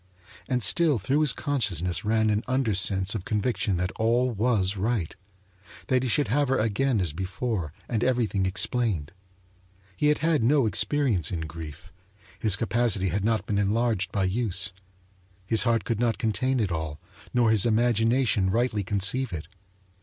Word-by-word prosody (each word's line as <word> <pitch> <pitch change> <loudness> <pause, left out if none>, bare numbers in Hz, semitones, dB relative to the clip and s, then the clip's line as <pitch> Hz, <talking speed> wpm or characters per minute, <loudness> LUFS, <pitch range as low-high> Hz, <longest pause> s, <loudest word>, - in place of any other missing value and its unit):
And 125 -2 0
still 160 -2 +4
through 120 +9 0
his 150 - +3
consciousness 95 - -2
ran 110 0 +2
an 105 0 +1
undersense 100 -6 +1
of 105 -5 -4
conviction 105 -2 -1
that 90 +1 -1
all 120 +3 +2
was 105 -4 +1
right 105 -3 -1 0.8
that 130 -1 +3
he 130 - -2
should 145 -1 +1
have 145 +5 +2
her 135 - +1
again 115 +3 +1
as 85 -6 -1
before, 95 - -3 0.2
and 115 -1 -1
everything 115 -7 +1
explained. 95 -5 0 0.8
He 150 - +1
had 150 - +3
had 160 -2 +1
no 135 +3 +3
experience 110 - +1
in 85 -3 -3
grief; 80 0 -9 0.5
his 105 -4 +2
capacity 110 -3 0
had 100 +4 -2
not 110 0 0
been 100 -1 -1
enlarged 105 -1 0
by 100 - 0
use. 95 -2 -1 0.7
His 110 +5 +2
heart 115 -3 +2
could 115 +1 -2
not 115 -3 +1
contain 125 +4 0
it 105 -5 0
all, 80 -3 -4 0.3
nor 120 -2 +3
his 110 0 +3
imagination 115 -2 +2
rightly 110 0 0
conceive 100 +6 -1
it. 80 -3 -6
110 Hz, 160 wpm, -26 LUFS, 95-125 Hz, 0.8 s, still